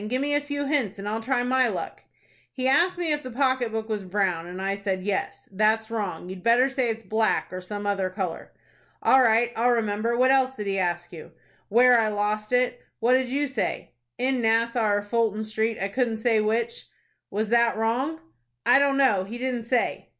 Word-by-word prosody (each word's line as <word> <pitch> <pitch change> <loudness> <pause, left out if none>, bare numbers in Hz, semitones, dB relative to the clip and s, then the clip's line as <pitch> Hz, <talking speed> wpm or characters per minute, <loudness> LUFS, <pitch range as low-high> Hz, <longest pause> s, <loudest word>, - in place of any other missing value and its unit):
Give 255 +4 -1
me 290 +1 -1
a 290 - +2
few 285 0 -4
hints, 270 -9 -1
and 200 +1 -6
I'll 220 +2 -2
try 245 +1 0
my 255 0 +2
luck." 195 -6 -5 0.5
"He 260 -1 -2
asked 345 +7 +3
me 345 -3 -1
if 295 - -2
the 255 - -8
pocket 260 -2 0
book 220 0 -3
was 215 -3 -3
brown, 185 -3 -1
and 180 +1 -7
I 195 +1 -1
said 195 -2 -3
yes. 200 0 -3
That's 220 +3 +1
wrong. 200 -7 -4
You'd 185 0 -8
better 240 +5 +4
say 260 -3 0
it's 225 0 -4
black, 220 -3 0
or 185 - -5
some 205 +2 -6
other 195 -2 0
color." 185 -3 -5 0.5
"All 265 - +6
right. 235 0 +3
I'll 235 +2 +2
remember. 230 0 0
What 255 +1 +4
else 265 -1 +2
did 210 - -5
he 195 -1 -1
ask 175 -1 -2
you?" 160 - -11 0.4
"Where 245 +2 +6
I 220 - +2
lost 210 +1 -2
it." 250 0 +1 0.2
"What 235 +2 +3
did 260 -1 +2
you 285 +3 0
say?" 265 -6 -3 0.3
"In 255 0 0
Nassau 230 0 +2
or 205 0 +1
Fulton 220 0 0
Street, 220 +1 -1
I 195 - -1
couldn't 230 +1 -1
say 225 -1 +2
which." 225 +2 -2 0.4
"Was 210 +2 -2
that 235 -1 +3
wrong?" 255 +9 -1 0.4
"I 250 +3 +6
don't 280 -1 +2
know, 210 -9 +3
he 225 +5 -7
didn't 245 -2 -3
say." 245 +1 -1
225 Hz, 210 wpm, -25 LUFS, 205-255 Hz, 0.5 s, All